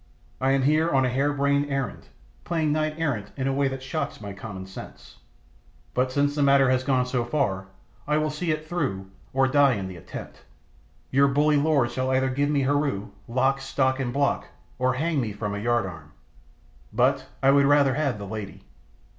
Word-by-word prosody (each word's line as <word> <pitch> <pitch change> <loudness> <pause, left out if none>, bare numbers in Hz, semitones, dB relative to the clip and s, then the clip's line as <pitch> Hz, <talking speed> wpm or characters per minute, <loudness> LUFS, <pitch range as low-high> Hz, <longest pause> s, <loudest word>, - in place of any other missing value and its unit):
I 130 - +2
am 135 -1 +2
here 155 +4 +3
on 135 -4 +3
a - - +1
hare 135 +4 +1
brained 140 0 +1
errand, 135 -2 -3 0.4
playing 160 -3 0
knight 155 0 0
errant 125 -11 -2
in 130 -1 -1
a 135 - +1
way 140 0 +2
that 135 0 -5
shocks 145 +4 -3
my 100 -2 -7
common 95 -2 -8
sense. 95 - -11 0.8
But 130 +1 +1
since 145 +1 +1
the 145 - -1
matter 140 -2 +5
has 130 0 +1
gone 130 -2 +2
so 125 -1 -1
far 110 -8 -1 0.4
I 150 +1 +2
will 155 0 0
see 165 +3 -3
it 155 0 -1
through, 95 - -3 0.2
or 135 0 +3
die 140 -1 +4
in 95 -2 -4
the 95 -1 -8
attempt. 85 - -9 0.7
Your 140 +1 +5
bully 145 +2 +3
lord 140 -5 +2
shall 130 +1 -1
either 130 0 +2
give 140 +2 0
me 145 -2 +2
Heru, 135 -7 0 0.2
stock, 130 +3 +1 0.2
lock, 130 -1 +2
and 125 -2 -1
block, 140 +2 0 0.3
or 130 0 +2
hang 155 +1 0
me 110 -4 -3
from 105 0 -4
a 100 - -3
yard 120 0 +1
arm. 80 -5 -9 0.8
But - - +2 0.2
I 135 - +6
would 140 0 +5
rather 145 -2 +4
have 140 -4 0
the 100 - -7
lady. 105 -1 -7
135 Hz, 195 wpm, -25 LUFS, 120-145 Hz, 0.8 s, I